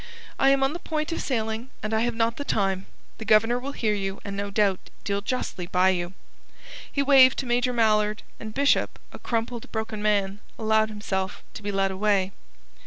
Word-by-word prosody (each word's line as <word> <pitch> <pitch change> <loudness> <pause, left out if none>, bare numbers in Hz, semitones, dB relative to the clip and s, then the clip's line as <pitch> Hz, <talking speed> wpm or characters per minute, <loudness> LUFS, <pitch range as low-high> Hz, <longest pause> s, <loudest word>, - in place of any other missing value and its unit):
"I 270 - +5
am 275 0 +4
on 270 +2 +1
the 345 - -5
point 310 -1 -3
of 330 - -2
sailing 225 -1 -2
and 215 +1 -2
I 220 - +3
have 235 0 0
not 230 0 +1
the 285 - -3
time. 195 -6 0 0.3
The - - -5
Governor 225 +3 +4
will 275 +3 -5
hear 215 -5 0
you, 195 -1 -3
and 200 -1 -4
no 200 0 -3
doubt 200 -2 +2 0.2
deal 200 0 -1
justly 205 -6 -3
by 185 +1 +3
you." 175 -1 -1 0.8
He 280 - +1
waved 265 -2 +7
to 270 - -2
Major 245 +1 +1
Mallard, 215 -3 +2 0.2
and 215 -1 -6
Bishop, 280 +5 +2
a - - -10
crumpled, 230 0 -3
broken 220 -1 -3
man, 200 -1 +1 0.2
allowed 220 0 +2
himself 195 -2 -3
to - - -8
be 205 0 -3
led 195 -1 +1
away. 195 -1 +1
220 Hz, 195 wpm, -26 LUFS, 200-245 Hz, 0.8 s, waved